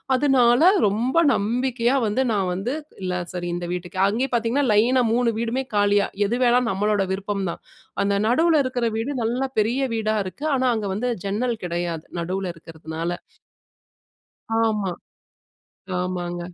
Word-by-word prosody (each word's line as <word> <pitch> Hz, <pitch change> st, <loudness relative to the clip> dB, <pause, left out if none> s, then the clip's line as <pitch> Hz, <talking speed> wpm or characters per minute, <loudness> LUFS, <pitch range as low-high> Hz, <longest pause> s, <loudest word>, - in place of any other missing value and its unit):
அதனால 255 Hz, -2 st, +4 dB, 0.3 s
ரொம்ப 230 Hz, +8 st, -1 dB, 0.2 s
நம்பிக்கையா 240 Hz, +3 st, 0 dB
வந்து 210 Hz, +6 st, 0 dB
நான் 190 Hz, -3 st, 0 dB
வந்து 200 Hz, +9 st, -2 dB, 0.3 s
இல்ல. 185 Hz, -1 st, -1 dB, 0.2 s
சரி 175 Hz, -1 st, -4 dB
இந்த 175 Hz, 0 st, -4 dB
வீட்டுக்கு 180 Hz, +1 st, -6 dB
அங்கேயே 245 Hz, +6 st, -1 dB
பாத்தீங்கன்னா, 240 Hz, +4 st, +1 dB
லைனா 245 Hz, +4 st, +4 dB
3 240 Hz, 0 st, +2 dB
வீடுமே 235 Hz, +3 st, -1 dB
காலியா. 205 Hz, 0 st, +3 dB, 0.2 s
எது 235 Hz, -, 0 dB
வேணாலும் 245 Hz, -1 st, +3 dB
நம்மளோட 205 Hz, +1 st, +1 dB
விருப்பம் 195 Hz, 0 st, -3 dB
தான். -, -, -9 dB, 0.4 s
அந்த 200 Hz, 0 st, +1 dB
நடுவுல 320 Hz, +9 st, +3 dB
இருக்கிற 250 Hz, -2 st, -1 dB
வீடு 230 Hz, +6 st, -2 dB
நல்லா 245 Hz, +4 st, 0 dB
பெரிய 230 Hz, +5 st, +2 dB
வீடா 220 Hz, -1 st, 0 dB
இருக்கு. 190 Hz, +10 st, -8 dB
ஆனா, 260 Hz, -1 st, +1 dB
அங்க 215 Hz, -2 st, -3 dB
வந்து 230 Hz, +6 st, -2 dB, 0.2 s
ஜன்னல் 225 Hz, +4 st, -1 dB
கிடையாது. 170 Hz, -2 st, -3 dB
நடுவுல 185 Hz, +2 st, -2 dB
இருக்கிறதுனால. 165 Hz, 0 st, -6 dB, 1.5 s
ஆமா. 210 Hz, -4 st, 0 dB, 1.1 s
ஆமாங்க. 175 Hz, -1 st, -3 dB
215 Hz, 140 wpm, -23 LUFS, 185-245 Hz, 1.5 s, அதனால